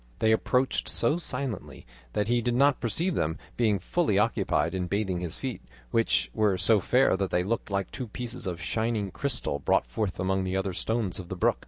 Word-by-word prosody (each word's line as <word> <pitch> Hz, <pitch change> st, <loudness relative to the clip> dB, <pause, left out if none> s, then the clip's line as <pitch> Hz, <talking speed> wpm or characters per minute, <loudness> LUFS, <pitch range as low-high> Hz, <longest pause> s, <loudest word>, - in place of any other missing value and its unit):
They 110 Hz, -, +3 dB
approached 125 Hz, +4 st, +1 dB
so 155 Hz, -, +2 dB
silently 130 Hz, -, -4 dB, 0.3 s
that 105 Hz, 0 st, 0 dB
he 120 Hz, +1 st, +2 dB
did 120 Hz, +1 st, 0 dB
not 140 Hz, +1 st, +4 dB
perceive 165 Hz, +10 st, 0 dB
them, 80 Hz, -, 0 dB, 0.2 s
being 110 Hz, -4 st, +2 dB
fully 105 Hz, -, +1 dB
occupied 105 Hz, -1 st, +1 dB
in 90 Hz, -1 st, -1 dB
bathing 95 Hz, -2 st, -1 dB
his 85 Hz, -2 st, -4 dB
feet, -, -, -4 dB, 0.3 s
which 115 Hz, 0 st, +2 dB
were 105 Hz, -4 st, +2 dB
so 105 Hz, +3 st, +4 dB
fair 125 Hz, +4 st, +3 dB
that 95 Hz, -1 st, -1 dB
they 90 Hz, -, +1 dB
looked 115 Hz, +4 st, -2 dB
like 100 Hz, -1 st, -1 dB
two 125 Hz, -, -5 dB
pieces 120 Hz, 0 st, -6 dB
of 90 Hz, -2 st, -3 dB
shining 110 Hz, +3 st, -1 dB
crystal 125 Hz, -, -2 dB
brought -, -, +2 dB
forth 90 Hz, -, -3 dB
among 95 Hz, +1 st, +1 dB
the 95 Hz, 0 st, -1 dB
other 95 Hz, -1 st, -1 dB
stones 110 Hz, 0 st, -1 dB
of 90 Hz, -1 st, -8 dB
the 95 Hz, -, -3 dB
brook. 90 Hz, -, +2 dB
105 Hz, 200 wpm, -28 LUFS, 95-120 Hz, 0.3 s, not